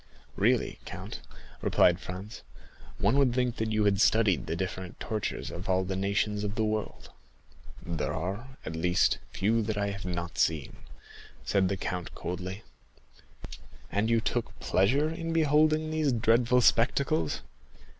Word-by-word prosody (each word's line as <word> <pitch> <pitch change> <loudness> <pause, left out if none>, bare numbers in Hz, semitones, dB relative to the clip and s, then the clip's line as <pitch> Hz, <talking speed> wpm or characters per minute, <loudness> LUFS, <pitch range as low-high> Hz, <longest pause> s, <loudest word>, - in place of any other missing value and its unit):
"Really, - - +1
count," - - -7 0.4
replied 90 0 +4
Franz, 95 +4 -8 0.6
"one 140 - +3
would 130 -3 +3
think 125 -2 0
that 110 0 -1
you 110 -1 +2
had 100 -1 +3
studied 105 - +3
the - - -1
different 95 0 -5
tortures 110 -2 -3
of 90 +2 -7
all 95 0 +3
the 95 0 -3
nations 100 +2 0
of 105 0 -3
the 110 -1 +1
world." 110 0 -3 0.7
"There 85 -3 -2
are, 105 +10 -5
at 80 - -4
least, 90 +2 +2
few 110 +4 +1
that 110 -1 -2
I 100 0 0
have 100 0 -7
not 85 -1 -4
seen," 80 -3 0 0.7
said 95 -2 +2
the 100 - -1
count 90 -1 -4
coldly. 95 +3 -5 1.3
"And 105 +3 +1
you 115 0 +4
took 120 +1 -2
pleasure 135 +12 +2
in 165 0 -4
beholding 155 0 +3
these 155 -3 +1
dreadful 120 +2 +3
spectacles?" 115 - +2
105 Hz, 145 wpm, -29 LUFS, 95-120 Hz, 1.3 s, replied